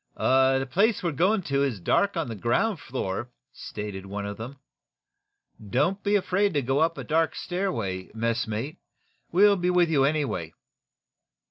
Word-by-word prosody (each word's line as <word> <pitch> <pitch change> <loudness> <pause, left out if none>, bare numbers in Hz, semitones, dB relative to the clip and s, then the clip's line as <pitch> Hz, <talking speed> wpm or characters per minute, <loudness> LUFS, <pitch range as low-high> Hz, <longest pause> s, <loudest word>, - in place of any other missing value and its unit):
"The 135 0 +3
place 200 - +2
we're 170 - 0
going 185 +8 +2
to 140 -3 0
is 125 -8 -1
dark 200 - +1
on 165 -4 -1
the 115 - -4
ground 160 - 0
floor," 120 -3 -4 0.2
stated 100 -2 -7
one 100 +1 -4
of 100 0 -5
them. 125 +5 -8 1.1
"Don't 145 - 0
be 205 0 +1
afraid 200 -1 +1
to 145 - +1
go 135 +3 +1
up 165 +1 +2
a - - -5
dark 160 +1 +1
stairway, 115 - -3
messmate. 115 +5 -2 0.5
We'll 200 +3 +5
be 180 0 0
with 180 -2 +3
you, 140 -4 +3
anyway." 135 - -1
140 Hz, 155 wpm, -26 LUFS, 115-180 Hz, 1.1 s, We'll